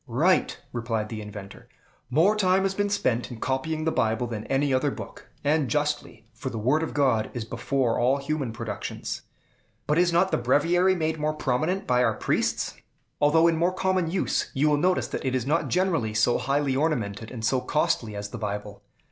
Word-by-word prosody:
"Right," 155 +10 +2 0.2
replied 115 -3 -2
the 110 -2 -5
inventor; 100 -2 -10 0.4
"more 165 +11 +4
time 190 -2 +3
has 195 0 0
been 205 +1 0
spent 125 - 0
in 120 -3 -8
copying 155 +5 -2
the 160 - +2
Bible 115 -2 +1
than 110 -3 -5
any 135 0 +1
other 130 +3 +2
book, - - -9
and 150 -1 +2
justly; 150 -6 -2
for 110 +4 -5
the 115 - -5
Word 130 +9 +2
of 160 - -4
God 130 -7 +2
is 120 -2 -3
before 115 +1 0
all 130 +3 +3
human 140 -3 -2
productions." 110 -3 -5 0.6
"But 150 +3 +2
is 175 0 +3
not 180 +3 +3
the - - +1
Breviary 170 +9 +3
made 160 -2 -1
more 155 +1 0
prominent 155 +7 -1
by 125 0 +3
our - - +2
priests?" - - 0 0.5
"Although 155 +3 +5
in 165 -1 +2
more 175 +3 +2
common 185 -2 0
use, 180 +2 0
you 145 +3 +3
will 145 - +3
notice 180 +4 +1
that - - -4
it 130 -1 0
is 125 -2 -1
not 155 +5 +1
generally 165 - 0
so 110 +3 +3
highly 140 0 0
ornamented 115 -8 -1
and 115 -3 -5
so 130 +2 +2
costly 115 -8 0
as 100 0 -5
the - - -7
Bible. 105 -1 -5
140 Hz, 195 wpm, -26 LUFS, 115-160 Hz, 0.6 s, Although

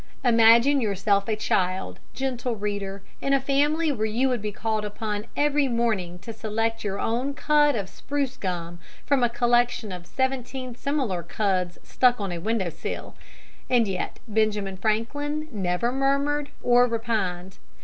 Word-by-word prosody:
Imagine 235 +3 +6
yourself 200 -1 +1
a 220 - +1
child, 185 -3 -1 0.2
gentle 250 -2 -2
reader, 200 -2 -4 0.2
in 275 - +1
a 275 - +5
family 290 +4 +2
where 220 -5 -1
you 245 +5 +1
would 245 -4 -1
be 210 0 -3
called 215 0 -2
upon 210 0 -4
every 290 -1 +3
morning 220 -8 0
to 225 +5 -8
select 225 +1 -2
your 200 -1 -2
own 255 +5 -1
cud 295 -1 +3
of 200 -4 -2
spruce 270 +7 -3
gum 175 -5 -4 0.3
from 280 -2 +2
a 240 - +4
collection 240 -2 +1
of 180 -1 -7
seventeen 260 +1 -2
similar 250 -8 -1
cuds 180 0 -1
stuck 245 -2 +3
on 200 -3 -2
a 175 - -3
window 200 -2 -1
sill! 165 - -6 0.6
And 240 -4 +4
yet 190 -2 -3
Benjamin 210 -3 0
Franklin 290 +9 -1
never 195 +2 0
murmured 280 +2 +1
or 245 0 +5
repined. 200 -6 -2
225 Hz, 150 wpm, -25 LUFS, 200-260 Hz, 0.6 s, Imagine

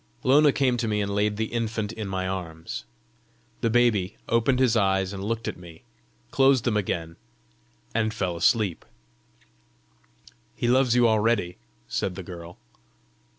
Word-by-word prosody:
Lona 145 +3 +5
came 130 -3 +1
to 115 - -1
me 105 -1 0
and 100 -1 -1
laid 105 0 0
the 110 +1 -3
infant 110 -2 -2
in 110 -3 -6
my 95 -1 -2
arms. 85 -4 -5 0.7
The 115 - 0
baby 110 -5 +2
opened 115 +3 +2
his 125 -3 +3
eyes 95 -2 +1
and 95 0 -6
looked 115 +2 -3
at - - -4
me, 85 -2 -13 0.5
closed 135 -2 +4
them 120 -4 0
again, 85 -5 -2 0.8
and 110 -1 +1
fell 95 -5 -2
asleep. 95 +1 +1 1.7
"He 120 - -2
loves 125 0 +3
you 120 -1 +5
already!" 110 -5 +1 0.3
said 95 - -2
the 95 - -6
girl. 85 -1 -10
105 Hz, 150 wpm, -25 LUFS, 95-120 Hz, 1.7 s, Lona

